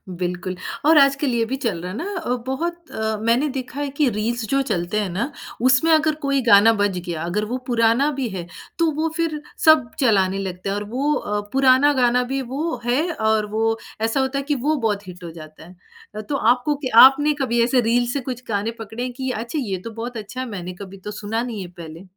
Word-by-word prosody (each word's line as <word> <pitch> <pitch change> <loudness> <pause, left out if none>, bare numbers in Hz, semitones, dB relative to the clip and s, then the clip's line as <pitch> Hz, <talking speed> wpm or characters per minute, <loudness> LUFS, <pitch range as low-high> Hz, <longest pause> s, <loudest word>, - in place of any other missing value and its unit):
बिल्कुल 180 +1 -3 0.3
और 315 0 +6
आजकल 275 0 +4
ये 230 -1 +1
भी 260 +4 -3
चल 225 -11 -2
रहा 180 +1 -5
है 210 - -6
ना 400 +5 -4
अ, 320 - -6 0.2
बहुत 340 +5 -4
अ, 220 0 -2
मैंने 235 +6 +2
देखा 260 +2 -6
है 290 -1 -2
कि 290 -5 +3
रील्स 225 +2 -2
जो 275 0 +2
चलते 210 -4 -1
हैं 200 -3 -1
ना, 235 - -2 0.3
उसमें 260 +6 +4
अगर 310 -1 +3
कोई 275 -1 +2
गाना 225 -1 +6
बज 205 -3 0
गया, 165 -2 -4
अगर 205 +5 -1
वो 245 +4 -3
पुराना 235 +4 +3
भी 265 -3 -2
है, 180 -3 -5 0.3
तो 330 -1 +3
वो 315 +2 -1
फिर 315 -3 -1 0.2
सब 310 -7 +6
चलाने 195 -6 +3
लगते 185 0 -4
हैं। 200 - -1
और 205 - -3
वो 280 +5 0
अ, 210 -6 -2
पुराना 270 +2 +5
गाना 250 -1 +3
भी 270 +2 -2
वो 275 +4 -3
है, 250 +5 +2
और 220 -2 +1
वो 225 +1 +1 0.2
ऐसा 225 +4 +1
होता 265 +1 0
है - - -4
कि 295 +1 -1
वो 295 +5 0
बहुत 210 -6 -2
हिट 180 0 -10
हो 170 - -7
जाता 155 -1 -12
है। 180 +1 -15 0.4
अ, 215 - -4
तो 280 +7 -4
आपको 250 +4 +2
क्य 280 -2 -4 0.2
आपने 295 +2 +1
कभी 235 -2 +1
ऐसे 250 +1 +3
रील्स 240 +1 +1
से 280 - -1
कुछ 250 0 -5
गानें 220 +2 -2
पकड़े 225 +1 -6
हैं 250 - -3
कि 260 0 -4
"अच्छा, 235 +7 -3
ये 200 -7 -2
तो 230 - -5
बहुत 230 +1 -6
अच्छा 215 +4 -7
है। 260 - -4
मैंने 180 -3 -6
कभी 195 0 -9
तो 210 - -4
सुना 220 +3 -3
नहीं 225 -5 -5
है 180 - -6
पहले।" 165 +2 -9
235 Hz, 235 wpm, -22 LUFS, 205-275 Hz, 0.4 s, और